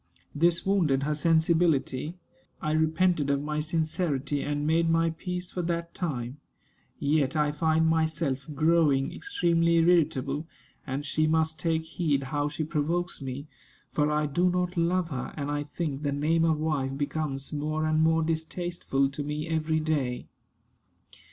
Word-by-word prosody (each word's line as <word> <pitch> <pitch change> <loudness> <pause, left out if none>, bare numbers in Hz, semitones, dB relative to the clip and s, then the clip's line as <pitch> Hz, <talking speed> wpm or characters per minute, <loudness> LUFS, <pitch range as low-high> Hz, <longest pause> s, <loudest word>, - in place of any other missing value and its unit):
This 170 +3 +2
wounded 165 -9 +2
her 150 +1 0
sensibility. 160 -1 +2 0.4
I 155 - -2
repented 160 0 +2
of 140 0 +1
my 150 0 -2
sincerity, 155 -3 -1
and 145 0 -2
made 165 +2 +2
my 165 0 +3
peace 180 +2 -5
for 180 - -3
that 170 0 -3
time. 135 -7 -3 0.6
Yet 145 -1 +1
I 150 -1 +2
find 160 +1 +2
myself 160 -4 0
growing 155 -3 +3
extremely 170 - +1
irritable, 160 -4 +2 0.4
and 135 +2 -3
she 155 +1 +1
must 160 0 +1
take 160 -1 0
heed 155 -4 -1
how 145 0 +1
she 150 +2 -3
provokes 165 +3 -1
me; 135 +1 -5 0.5
for 150 0 +1
I 150 0 +1
do 175 +5 +2
not 180 0 -1
love 175 +1 +1
her, 130 -2 -4
and 145 -1 -2
I 145 0 -1
think 145 -1 -4
the 145 -2 -1
name 160 +4 +2
of 160 -2 +2
wife 145 -4 -1
becomes 145 -1 -3
more 155 +1 -1
and 155 0 +2
more 160 0 +3
distasteful 160 -3 -1
to 140 +2 -5
me 150 +2 -3
every 160 -1 0
day. 145 -6 -1
155 Hz, 150 wpm, -28 LUFS, 145-165 Hz, 0.6 s, my